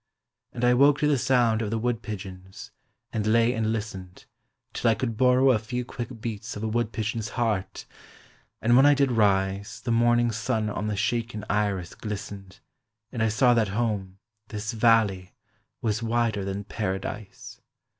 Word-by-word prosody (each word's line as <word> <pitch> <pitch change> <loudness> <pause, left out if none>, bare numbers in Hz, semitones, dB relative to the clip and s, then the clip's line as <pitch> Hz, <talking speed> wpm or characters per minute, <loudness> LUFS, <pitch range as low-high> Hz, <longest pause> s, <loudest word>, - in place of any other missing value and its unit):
And 120 0 -2
I 125 - +5
woke 140 +3 +5
to 150 - +3
the 150 - +3
sound 120 -3 +2
of 110 - -2
the 115 - -1
wood 120 0 -1
pigeons, 95 -4 -8 0.4
and 110 -1 -1
lay 115 +2 +3
and 110 -2 0
listened, 95 -5 -6 0.5
Till 120 - +1
I 115 - +3
could 115 +1 -3
borrow 130 +2 +4
A 115 - +2
few 125 +3 -4
quick 120 -1 -7
beats 110 -1 -5
of 105 - -6
a - - 0
wood 115 0 -1
pigeon's 110 +1 -3
heart, 110 -6 -1 0.8
and 120 +2 +4
when 135 +3 +7
I 145 - +6
did 140 -2 +2
rise 100 -1 +1
The 120 - -3
morning 120 0 +3
sun 110 -1 -1
on 105 +1 -3
the 105 - -1
shaken 110 +1 -2
iris 100 -4 -1
glistened, 100 -2 -7 0.5
And 115 - -4
I 110 - +3
saw 120 +3 +4
that 115 -3 +2
home, 100 -5 -2 0.3
this 110 +1 -4
valley, 110 -5 +2 0.5
was 110 0 0
wider 115 -3 0
than 100 +1 -4
Paradise. 100 0 -5
110 Hz, 170 wpm, -26 LUFS, 105-120 Hz, 0.8 s, when